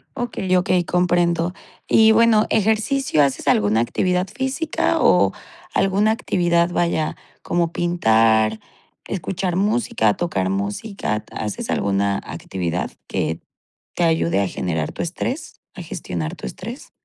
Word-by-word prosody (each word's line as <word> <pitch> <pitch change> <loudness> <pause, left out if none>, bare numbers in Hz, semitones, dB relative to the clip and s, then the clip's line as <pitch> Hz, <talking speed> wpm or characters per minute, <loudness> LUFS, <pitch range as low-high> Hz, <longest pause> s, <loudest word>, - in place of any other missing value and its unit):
Okey, 240 -7 -4
okey, 180 0 +2
comprendo. 175 -1 +1 0.3
Y 220 0 +6
bueno, 220 -1 +5
ejercicio, 220 - +2
¿haces 140 -2 -1
alguna 105 +1 +3
actividad 180 +9 0
física 265 - -1
o - - +4 0.4
alguna 200 +3 +2
actividad?, 175 -6 +1
vaya, 170 -3 0 0.3
como 170 -1 0
pintar, 110 -11 +2 0.5
escuchar 180 0 -3
música, 200 - +1
tocar 95 - -1
música, 105 - -3
¿haces 105 -2 -5
alguna 100 0 +1
actividad 90 -1 -4 0.2
que 80 - -2 0.5
te 175 - 0
ayude 165 -8 +2
a 100 - 0
generar 80 -4 -2
tu - - -6
estrés, 255 - -4
a 185 - -7
gestionar 90 - -5
tu - - -9
estrés? 65 - -8
170 Hz, 120 wpm, -21 LUFS, -, 0.5 s, Y